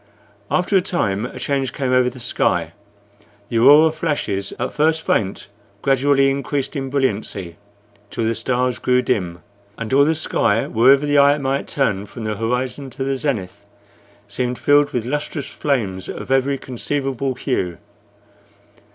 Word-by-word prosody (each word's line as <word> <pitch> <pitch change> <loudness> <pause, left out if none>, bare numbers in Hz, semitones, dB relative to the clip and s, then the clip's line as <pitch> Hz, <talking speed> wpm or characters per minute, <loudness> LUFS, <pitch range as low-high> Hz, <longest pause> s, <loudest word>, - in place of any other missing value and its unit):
After 185 +2 +1
a 190 - +5
time 110 - -1
a - - -11
change 135 -2 -1
came 135 -3 -2
over 125 -1 +3
the 125 - -13
sky: - - 0 0.8
the 115 - 0
aurora 150 +6 +7
flashes, 145 -11 -2
at - - -3
first 160 +1 +1
faint, 95 -2 0 0.4
gradually 135 0 +3
increased 140 +1 -2
in 135 -1 -3
brilliancy 105 -9 -2 0.5
till 115 - -3
the 115 +1 +1
stars 125 +2 -1
grew 125 0 +2
dim, 90 -7 -2 0.3
and 115 +2 -4
all 140 +1 +6
the 160 +2 +2
sky, 115 -7 +1
wherever 135 +5 +4
the 145 0 +3
eye 140 +1 +5
might 140 -1 -2
turn 105 -8 -1
from 115 +2 -9
the 110 -1 -2
horizon 125 +5 -2
to 135 - -5
the 135 0 -1
zenith, 130 -10 -3 0.6
seemed 125 0 -2
filled 145 0 +4
with 120 -2 -3
lustrous 145 +1 -3
flames 105 -10 -2
of - - -6
every 135 +1 +2
conceivable 135 0 -3
hue. 90 - -2
130 Hz, 150 wpm, -20 LUFS, 115-140 Hz, 0.8 s, aurora